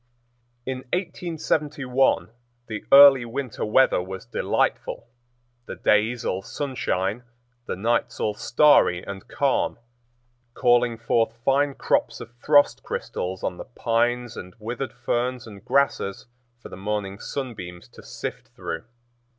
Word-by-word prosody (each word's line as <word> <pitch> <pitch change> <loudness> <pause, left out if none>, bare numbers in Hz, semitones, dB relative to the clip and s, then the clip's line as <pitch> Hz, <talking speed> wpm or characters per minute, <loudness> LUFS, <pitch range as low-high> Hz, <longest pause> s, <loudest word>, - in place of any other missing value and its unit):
In 130 0 -3
1871 150 - 0 0.3
the 110 -3 -6
early 140 -2 +9
winter 125 +1 -4
weather 110 -2 +3
was 95 +1 -7
delightful; - - -1 0.6
the - - -6
days 110 +3 +1
all 95 - -1
sunshine, 110 -5 -2 0.5
the - - -2
nights 115 +6 0
all 105 - 0
starry 115 -5 +4
and 100 -1 -8
calm, 140 -2 0 0.8
calling 120 -1 +3
forth 115 0 0
fine 140 +1 +2
crops - - 0
of 115 - -9
frost 145 +4 +3
crystals 95 +1 -4
on 90 - -2
the - - -7
pines 120 0 0
and 90 +3 -9
withered 120 +5 -5
ferns 125 +1 -2
and 100 -4 -12
grasses 140 -8 0 0.4
for - - -9
the - - -9
morning 100 0 -3
sunbeams 95 - -6
to - - -14
sift - - -7
through. 80 0 -5
120 Hz, 125 wpm, -24 LUFS, 105-135 Hz, 0.8 s, early